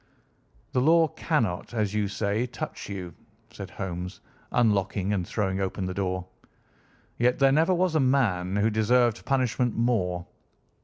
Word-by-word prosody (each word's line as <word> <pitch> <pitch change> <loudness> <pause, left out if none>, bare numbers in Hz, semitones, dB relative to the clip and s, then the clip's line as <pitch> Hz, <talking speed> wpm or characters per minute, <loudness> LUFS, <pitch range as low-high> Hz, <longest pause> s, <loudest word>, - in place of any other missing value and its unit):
"The 125 - +1
law 160 +3 +5
cannot, 120 - -1
as 105 -3 0
you 105 -1 +1
say, 105 +4 -1
touch - - -6
you," 90 -4 -6 0.4
said 100 -2 -8
Holmes, 90 -1 -5 0.3
unlocking 100 -3 +1
and 90 -4 -1
throwing 95 -3 -1
open 95 0 -2
the 90 - -3
door, 95 -1 -2 0.9
"yet 125 +1 +3
there 135 -1 +4
never 160 +6 +3
was 180 -1 +1
a 155 - +3
man 110 -9 +1
who 105 +2 +2
deserved 120 +2 +2
punishment 125 -3 +1
more. 90 -7 0
105 Hz, 145 wpm, -27 LUFS, 95-125 Hz, 0.9 s, law